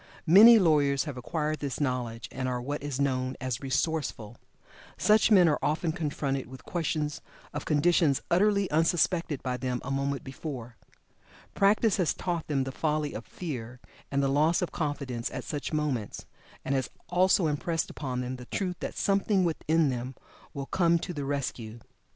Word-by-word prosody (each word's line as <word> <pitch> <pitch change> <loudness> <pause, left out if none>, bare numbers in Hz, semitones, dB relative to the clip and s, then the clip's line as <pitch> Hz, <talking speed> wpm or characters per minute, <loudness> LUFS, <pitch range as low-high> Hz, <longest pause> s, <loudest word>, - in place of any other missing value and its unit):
Many 210 +8 +9
lawyers 145 -7 +3
have 145 -4 -6
acquired 155 +4 -2
this 140 -3 -4
knowledge, 125 -5 -2
and 130 0 -3
are 125 -1 -2
what 145 +4 -4
is 140 -2 -4
known 130 -2 0
as 130 -2 -3
"resourceful." 135 -5 -2 0.6
Such 215 +1 +4
men 190 -5 +6
are 150 - +2
often 160 +2 0
confronted 145 -5 -2
with 130 0 -12
questions 155 -3 -2 0.3
of 145 - -4
conditions 155 -1 +3
utterly 200 +2 +3
unsuspected 165 -1 +1
by 125 -1 -2
them 125 0 -2
a 135 - -4
moment 140 0 -1
before. 130 -4 -7 0.8
Practice 205 +1 +3
has 180 -5 +1
taught 170 -3 -3
them 140 -3 0
the 135 - -4
folly 150 +1 -1
of 115 - -7
fear 125 -8 -6 0.3
and 140 0 +1
loss 155 +6 +2
of 175 - -3
confidence 140 -6 -3
at - - -6
such 145 -2 -4
moments, 145 -9 -2 0.4
and 135 - 0
has 130 -2 -1 0.2
also 180 0 +3
impressed 160 +2 -1
upon 130 -4 -4
them 125 +1 -4
the 125 - -10
truth 180 -3 -2
that - - -5
something 195 -1 +2
within 160 -2 +1
them 125 +1 -4 0.4
will 140 -1 -4
come 170 +2 +2
to 175 +2 -5
the 145 -3 -4
rescue. 120 -5 -3
145 Hz, 165 wpm, -28 LUFS, 130-165 Hz, 0.8 s, Many